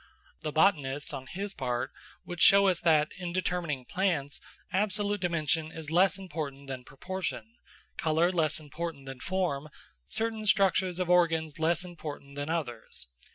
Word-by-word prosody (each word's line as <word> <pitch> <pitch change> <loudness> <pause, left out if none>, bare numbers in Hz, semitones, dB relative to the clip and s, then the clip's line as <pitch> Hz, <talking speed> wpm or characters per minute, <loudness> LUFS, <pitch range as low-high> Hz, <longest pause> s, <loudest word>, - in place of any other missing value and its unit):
The 155 - -3
botanist, 145 -5 +2
on 130 -2 -6
his 200 +6 -4
part, 125 -5 -2 0.3
would 175 0 -5
show 200 0 +8
us 180 -3 +1
that, 155 -2 +4
in 175 -2 -3
determining 170 -7 -1
plants, 160 -7 -1 0.3
absolute 205 +1 +1
dimension 165 -2 0
is 160 -2 -6
less 185 +3 +4
important 150 -7 -5
than 130 -2 -5
proportion, 190 - -5 0.5
colour 160 +3 +3
less 160 -4 +1
important 155 -1 -6
than 135 -1 -7
form, 170 -5 -1 0.4
certain 220 - -2
structures 190 -3 +3
of 180 -1 -1
organs 165 -4 +3
less 165 +2 +2
important 155 -5 -8
than 145 +1 -3
others. 120 - -4
165 Hz, 145 wpm, -30 LUFS, 145-185 Hz, 0.5 s, show